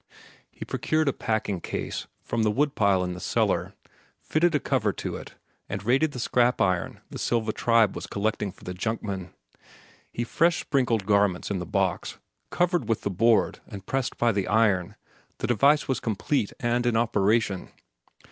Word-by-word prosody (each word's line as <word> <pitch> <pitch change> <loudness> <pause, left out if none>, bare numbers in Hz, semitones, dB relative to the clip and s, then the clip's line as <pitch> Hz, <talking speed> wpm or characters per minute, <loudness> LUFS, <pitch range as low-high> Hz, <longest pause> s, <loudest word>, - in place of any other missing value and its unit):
He - - -9
procured 155 -1 0
a 140 - +2
packing 105 -5 -2
case - - -4 0.2
from 115 - -1
the 110 - +3
woodpile 105 -7 +2
in 90 0 -3
the 90 - -7
cellar, - - 0 0.4
fitted 170 +1 +1
a - - +3
cover - - +1
to - - -5
it, - - -9 0.3
and 100 - -4
raided 135 +7 +2
the 125 - -7
scrap 125 +1 +2
iron 90 -3 0
the - - -6
Silva 110 -2 0
tribe 115 -4 +3
was - - -6
collecting 105 -1 -1
for 95 - -20
the 90 - -5
junkman. 100 -2 -3 0.9
With 120 0 -1
fresh 170 +5 +2
sprinkled 120 -8 0
garments 100 -2 +2
in 95 - -1
the 90 - -5
box, - - -1 0.3
covered 175 -4 0
with 115 - +1
the 100 - -2
board 115 +4 +3
and 100 -3 -9
pressed 135 +2 -2
by 120 -1 +3
the 100 -3 -1
iron, 100 -5 +2 0.4
the - - -3
device 140 +6 +3
was 130 - 0
complete 110 +1 -1
and 120 0 0
in 115 -2 +2
operation. 110 -3 +1
110 Hz, 170 wpm, -26 LUFS, 100-125 Hz, 0.9 s, the